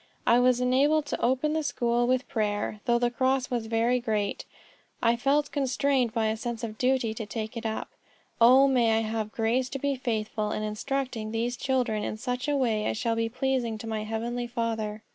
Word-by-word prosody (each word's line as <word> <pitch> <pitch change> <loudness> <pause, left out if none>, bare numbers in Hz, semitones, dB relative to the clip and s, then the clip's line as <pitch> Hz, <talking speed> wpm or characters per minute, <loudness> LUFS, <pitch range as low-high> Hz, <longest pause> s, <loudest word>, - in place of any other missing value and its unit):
I 235 +1 +5
was 250 0 +4
enabled 280 +5 +3
to - - -4
open 260 +5 +1
the 315 - 0
school 240 -4 0
with 255 +1 +1
prayer. 210 -4 -1
Though 240 -2 +3
the 240 0 +1
cross 260 +1 0
was 235 -3 -1
very 230 +2 +2
great, 215 -4 -2 0.5
I 230 0 +3
felt 280 +4 +1
constrained 270 -2 +1
by 225 -1 0
a 220 - -1
sense 235 0 -5
of 220 -1 -5
duty 250 -3 +1
to 220 -1 -6
take 220 +2 -5
it 230 -1 -3
up. 220 - -3 0.5
O 260 +4 +7
may 235 -4 +3
I - - +2
have 220 -1 -3
grace 240 +4 0
to 275 - -4
be 280 +1 0
faithful 215 -3 -2
in 215 - -3
instructing 225 +1 -3
these 230 +2 -1
children 245 -5 0
in 215 - -3
such 250 +2 -3
a 290 -1 +1
way 225 -5 +1
as - - -1
shall 230 0 0
be 225 0 0
pleasing 250 -2 -1
to 220 - -8
my 220 -1 -3
heavenly 235 +3 -3
Father." 225 -3 -3
235 Hz, 200 wpm, -27 LUFS, 220-260 Hz, 0.5 s, O